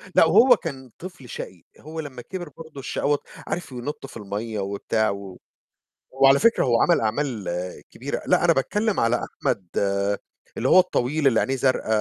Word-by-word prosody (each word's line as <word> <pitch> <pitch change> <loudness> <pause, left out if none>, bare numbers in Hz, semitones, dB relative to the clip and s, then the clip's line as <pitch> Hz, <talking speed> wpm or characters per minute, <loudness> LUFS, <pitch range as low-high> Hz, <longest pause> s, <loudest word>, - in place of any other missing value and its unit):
لأ - - +7
وهو 225 +10 +7
كان 135 -6 -7
طفل 175 -8 -10
شقي، 90 -5 -8 0.2
هو 160 +2 -8
لمّا 140 -5 -6
كِبِر 175 +3 -7
برضو 160 -3 -10
الشقاوة 145 +2 0 0.3
عارف 175 -6 -4
ينط 125 +4 -6
في 135 - -10
المَيِّة 105 +1 -4
وبتاع 100 +2 0
و 100 -2 -6 0.8
هو 135 +1 +5
على 135 +1 +6
فكرة 230 +7 +4
هو 120 -2 +3
عَمَل - - +4
أعمال 115 -1 -1 0.5
كبيرة. - - -4
لأ، - - +3
أنا - - +5
باتكلم 210 +10 0
على 115 +1 +3
أحمد 95 -3 -3 0.9
اللي - - 0
هو - - +8
الطويل 155 -4 +1
اللي 115 -4 +4
عينيه 135 - 0
زرقا 130 -3 0
135 Hz, 170 wpm, -24 LUFS, 115-160 Hz, 0.9 s, هو